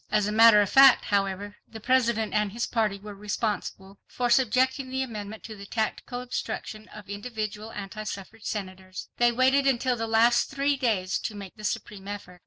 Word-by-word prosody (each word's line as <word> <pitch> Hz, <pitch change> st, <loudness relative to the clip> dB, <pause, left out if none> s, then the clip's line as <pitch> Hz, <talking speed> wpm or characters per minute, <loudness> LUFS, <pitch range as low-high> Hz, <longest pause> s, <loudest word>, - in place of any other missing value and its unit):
As 210 Hz, -1 st, +2 dB
a 210 Hz, -, -1 dB
matter 220 Hz, -1 st, +7 dB
of 200 Hz, -, 0 dB
fact, 270 Hz, -1 st, +7 dB
however, 200 Hz, 0 st, -1 dB
the 220 Hz, -, -10 dB
President 235 Hz, -2 st, +1 dB
and 210 Hz, -1 st, +1 dB
his 235 Hz, +3 st, -2 dB
party 215 Hz, -4 st, 0 dB
were 205 Hz, +1 st, -9 dB
responsible 200 Hz, -1 st, -4 dB
for 245 Hz, -1 st, -2 dB
subjecting 260 Hz, +2 st, +2 dB
the 265 Hz, +1 st, -1 dB
amendment 215 Hz, -3 st, -7 dB
to 220 Hz, -, -8 dB
the 200 Hz, -1 st, -11 dB
tactical 240 Hz, +3 st, -3 dB
obstruction 220 Hz, -3 st, -5 dB
of 210 Hz, -1 st, -12 dB
individual 215 Hz, 0 st, -5 dB
anti 205 Hz, +1 st, -7 dB
suffrage 205 Hz, +1 st, -8 dB
Senators. 185 Hz, -2 st, -6 dB
They 240 Hz, 0 st, +4 dB
waited 265 Hz, +3 st, +3 dB
until 255 Hz, -1 st, +2 dB
the 225 Hz, -1 st, -3 dB
last 230 Hz, +2 st, +3 dB
three 280 Hz, +1 st, 0 dB
days 210 Hz, -8 st, 0 dB
to 215 Hz, -, -5 dB
make 200 Hz, -2 st, -9 dB
the 215 Hz, -, -13 dB
supreme 205 Hz, -2 st, -4 dB
effort. 200 Hz, -3 st, -8 dB
215 Hz, 185 wpm, -26 LUFS, 205-240 Hz, -, matter